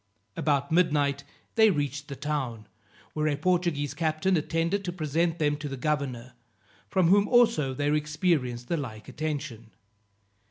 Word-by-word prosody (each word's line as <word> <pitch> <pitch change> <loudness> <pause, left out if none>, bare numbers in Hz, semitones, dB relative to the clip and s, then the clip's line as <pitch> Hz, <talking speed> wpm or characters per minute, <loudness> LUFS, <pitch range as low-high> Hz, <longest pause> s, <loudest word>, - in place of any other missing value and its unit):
About 140 -1 0
midnight 145 -5 +2 0.3
they 220 -1 +6
reached 145 -4 -2
the 140 - -6
town, 130 -6 -3 0.5
where 155 0 0
a 145 -2 0
Portuguese 170 -6 0
captain 160 +4 0
attended 165 +5 0
to 180 - -3
present 165 0 0
them 145 -2 +1
to 145 -1 -5
the 135 - -5
governor, 130 -4 -2 0.6
from 185 -3 +3
whom 200 +2 +5
also 230 - +3
they 145 +2 +1
experienced 150 -6 0
the 170 - 0
like 110 -7 -6
attention. 145 -7 -5
150 Hz, 145 wpm, -27 LUFS, 140-170 Hz, 0.6 s, they